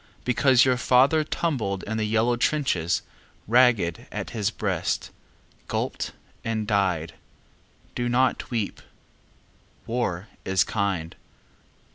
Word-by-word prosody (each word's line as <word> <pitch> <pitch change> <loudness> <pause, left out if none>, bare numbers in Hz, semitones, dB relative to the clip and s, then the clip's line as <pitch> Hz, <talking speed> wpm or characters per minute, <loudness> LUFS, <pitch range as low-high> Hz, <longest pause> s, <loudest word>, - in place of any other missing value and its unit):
Because 125 +1 +4
your 130 -1 +3
father 130 +5 +4
tumbled 120 - -2
in 110 +1 -3
the 110 - 0
yellow 115 +3 +2
trenches, 120 - 0 0.4
Raged 115 -8 +3
at - - -5
his 110 -3 0
breast, 95 -6 -2 0.6
gulped - - -3 0.3
and 110 -1 -1
died, 95 -6 0 0.8
Do 120 0 -1
not 125 +1 +1
weep. 115 -5 -2 1.0
War 110 -5 -2 0.2
is 95 -1 +2
kind. 95 -6 -2
110 Hz, 105 wpm, -25 LUFS, 95-125 Hz, 1.0 s, Because